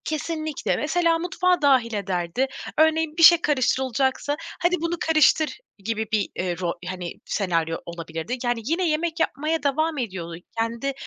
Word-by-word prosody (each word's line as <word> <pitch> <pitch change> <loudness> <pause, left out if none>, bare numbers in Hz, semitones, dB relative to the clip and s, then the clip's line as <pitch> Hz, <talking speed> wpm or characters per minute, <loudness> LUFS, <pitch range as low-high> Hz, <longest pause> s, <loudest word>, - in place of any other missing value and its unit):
Kesinlikle. 310 -1 -2
Mesela, 330 +2 +1
mutfağa 360 0 +1
dâhil 260 -5 +3
ederdi. 190 +4 -1 0.3
Örneğin, 315 0 +2
bir 335 - +3
şey 340 0 +9
karıştırılacaksa 265 0 0 0.2
"Hadi, 350 +1 +3
bunu 335 +1 -1
karıştır." 315 -1 +3 0.3
gibi 220 0 -2
bir, 215 -2 +1
eee, 180 -1 -2
ro 175 -2 -1
hani, 180 -2 -5
senaryo 165 -5 -1
olabilirdi. 165 +6 -5
Yani, 240 -1 0
yine 335 +5 +1
yemek 325 +2 -1
yapmaya 315 +1 -1
devam 310 +3 0
ediyordu. 185 -9 -4 0.2
Kendi, 235 +4 -1
275 Hz, 140 wpm, -24 LUFS, 200-320 Hz, 0.3 s, şey